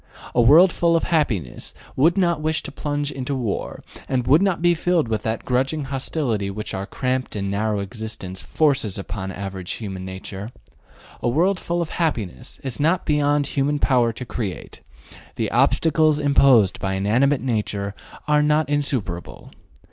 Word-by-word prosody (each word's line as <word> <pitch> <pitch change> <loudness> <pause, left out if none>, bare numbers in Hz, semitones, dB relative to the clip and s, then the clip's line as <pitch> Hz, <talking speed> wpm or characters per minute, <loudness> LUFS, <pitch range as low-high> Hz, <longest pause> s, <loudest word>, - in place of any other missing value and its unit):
A 120 - +4
world 160 +10 +7
full 170 0 +2
of 165 - +1
happiness 115 - -1 0.2
would 165 +8 +3
not 170 -4 +2
wish 155 0 0
to - - -6
plunge 145 0 -2
into 135 0 -3
war, 120 -6 -3 0.3
and 125 -2 0
would 145 +7 +5
not 195 -3 +1
be 175 +1 +4
filled 170 -3 +1
with 110 -2 -1
that 110 +1 -3
grudging 135 +4 0
hostility 130 -6 -2
which 105 +3 -5
our 95 0 -4
cramped 130 -1 -2
and 100 -1 -2
narrow 105 +1 0
existence 100 -2 -5
forces 140 -10 +1
upon 95 0 -5
average 95 -1 -5
human 95 -4 -6
nature. 95 +3 -7 0.7
A - - +1
world 180 +9 +2
full 170 0 -1
of 160 - -8
happiness 110 - -3
is 130 -1 -4
not 165 +5 +2
beyond 145 -1 +2
human 145 +1 0
power 125 -5 +3
to 125 +3 -7
create; 105 -6 -5 0.5
the - - -2
obstacles 155 -2 +3
imposed 135 -9 +4
by 95 0 -1
inanimate 125 +9 +2
nature 105 -5 -2 0.3
are 150 0 +4
not 150 +1 +2
insuperable. 130 -12 -3
130 Hz, 160 wpm, -22 LUFS, 105-150 Hz, 0.7 s, world